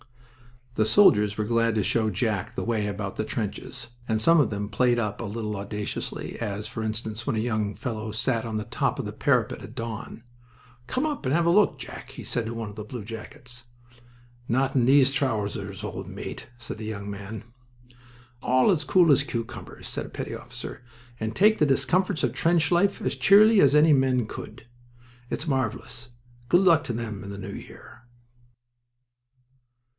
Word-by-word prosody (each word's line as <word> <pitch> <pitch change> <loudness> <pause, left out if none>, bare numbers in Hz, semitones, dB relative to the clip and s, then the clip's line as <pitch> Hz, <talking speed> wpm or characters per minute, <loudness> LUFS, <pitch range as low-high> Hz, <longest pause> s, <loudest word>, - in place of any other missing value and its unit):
The 110 - +3
soldiers 105 - +5
were 110 - 0
glad 115 0 +1
to 105 - +2
show 110 +1 +1
Jack 105 -1 -1
the - - -2
way 110 -3 0
about 100 -1 -4
the 110 - -1
trenches, 105 -1 -5 0.2
and 110 -1 +1
some 165 +7 +5
of 145 - +3
them 105 -1 -3
played 120 +4 +2
up 105 -3 -2
a - - -3
little 105 0 -4
audaciously, 105 +1 -5
as, 105 -2 -3
for 115 +1 -5
instance, 110 +1 -4
when - - +1
a - - 0
young 110 -3 -1
fellow 110 -3 -4
sat 115 +1 0
on 110 -1 -4
the 110 - -1
top - - -1
of - - -3
the - - -4
parapet - - +1
at - - -10
dawn. 115 0 -6 0.6
"Come 255 - 0
up 295 - -3
and 130 +3 +2
have 170 0 +2
a - - +4
look, 205 +3 +4
Jack," - - -9
he - - -9
said 120 -2 -2
to 115 - -4
one 115 -2 -4
of 105 - -11
the 105 - -6
bluejackets. 120 +2 -8 0.8
"Not 135 +3 +1
in 125 -3 +3
these 135 +1 +6
trousers, 105 -8 -2
old - - -5
mate!" - - -7
said 120 -2 -7
that - - -6
young 100 -2 -5
man. 100 +1 -7 1.0
"All 130 +10 +4
as 155 -5 0
cool 170 +2 +5
as 140 0 +5
cucumbers," 115 -7 -6
said - - -4
a - - -10
petty - - -5
officer, - - -8 0.4
"and 110 0 -3
take 215 +2 +5
the 150 - +5
discomforts 155 +7 +1
of - - +1
trench 165 -2 +2
life 190 +3 +2
as - - -1
cheerily 210 +2 +7
as 145 -4 +5
any 150 +1 +6
men 130 -3 +2
could. 110 - -9 0.6
It's 155 - -3
marvelous. 130 -2 -2 0.4
Good 175 +5 +5
luck 170 -5 +5
to 120 - -3
them 110 -3 -4
in 100 - -8
the 100 - -6
new 100 0 -6
year!" - - -12
115 Hz, 185 wpm, -26 LUFS, 105-140 Hz, 1.0 s, cheerily